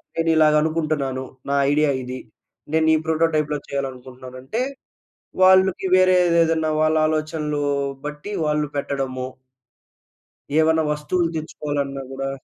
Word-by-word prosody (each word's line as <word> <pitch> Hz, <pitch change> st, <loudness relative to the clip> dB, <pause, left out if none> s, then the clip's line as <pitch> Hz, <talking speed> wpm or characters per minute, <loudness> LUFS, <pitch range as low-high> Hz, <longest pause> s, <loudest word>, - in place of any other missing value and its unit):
నేను 165 Hz, 0 st, 0 dB
ఇలాగ 155 Hz, -1 st, +5 dB
అనుకుంటున్నాను. 155 Hz, -5 st, -1 dB, 0.3 s
నా 140 Hz, -, +1 dB, 0.2 s
ఐడియా 150 Hz, 0 st, +3 dB
ఇది 125 Hz, +1 st, -6 dB, 0.5 s
నేను 160 Hz, 0 st, +3 dB
ఈ -, -, +3 dB
ప్రోటోటైప్‌లో 155 Hz, -2 st, +1 dB
చేయాలనుకుంటున్నాను. 130 Hz, -2 st, -6 dB
అంటే 220 Hz, -, -3 dB, 0.8 s
వాళ్ళకి 190 Hz, 0 st, +5 dB
వేరే 185 Hz, 0 st, +5 dB
ఏదేదన్నా 165 Hz, -2 st, +2 dB
వాళ్ళ 155 Hz, 0 st, +2 dB
ఆలోచనలు 155 Hz, -1 st, -2 dB, 0.4 s
బట్టి 150 Hz, +6 st, -7 dB, 0.2 s
వాళ్ళు 150 Hz, 0 st, 0 dB
పెట్టడము. 135 Hz, -2 st, -3 dB, 1.3 s
ఏవన్నా 160 Hz, 0 st, +3 dB
వస్తువులు 165 Hz, +3 st, -1 dB
తెచ్చుకోవాలన్నా 145 Hz, -3 st, -3 dB
గూడా 135 Hz, 0 st, -4 dB
150 Hz, 110 wpm, -22 LUFS, 140-160 Hz, 1.3 s, ఇలాగ